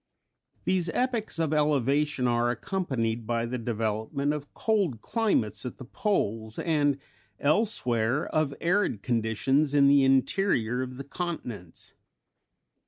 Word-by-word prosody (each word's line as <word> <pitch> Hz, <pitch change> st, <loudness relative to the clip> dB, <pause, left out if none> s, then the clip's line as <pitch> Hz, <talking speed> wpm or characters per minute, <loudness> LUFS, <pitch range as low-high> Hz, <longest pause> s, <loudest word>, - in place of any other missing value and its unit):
These 180 Hz, -3 st, +1 dB
epochs 245 Hz, -7 st, -1 dB
of 160 Hz, -2 st, 0 dB
elevation 145 Hz, -2 st, +2 dB
are 120 Hz, 0 st, +2 dB
accompanied 120 Hz, -, -2 dB
by 115 Hz, 0 st, 0 dB
the 125 Hz, +1 st, -3 dB
development 115 Hz, +5 st, -1 dB
of 145 Hz, -1 st, -6 dB
cold 200 Hz, -, 0 dB
climates 210 Hz, -, 0 dB
at 125 Hz, -, -6 dB
the 130 Hz, -, -9 dB
poles, 110 Hz, -, -1 dB
and 145 Hz, -4 st, +1 dB, 0.4 s
elsewhere 140 Hz, -, +1 dB
of 155 Hz, -2 st, 0 dB
arid 175 Hz, -, +1 dB
conditions 125 Hz, +6 st, +1 dB
in 140 Hz, -1 st, +6 dB
the 140 Hz, 0 st, +6 dB
interior 135 Hz, -, +2 dB
of 130 Hz, -1 st, -5 dB
the 140 Hz, -, -5 dB
continents. 130 Hz, -, -6 dB
135 Hz, 120 wpm, -27 LUFS, 115-160 Hz, 0.4 s, in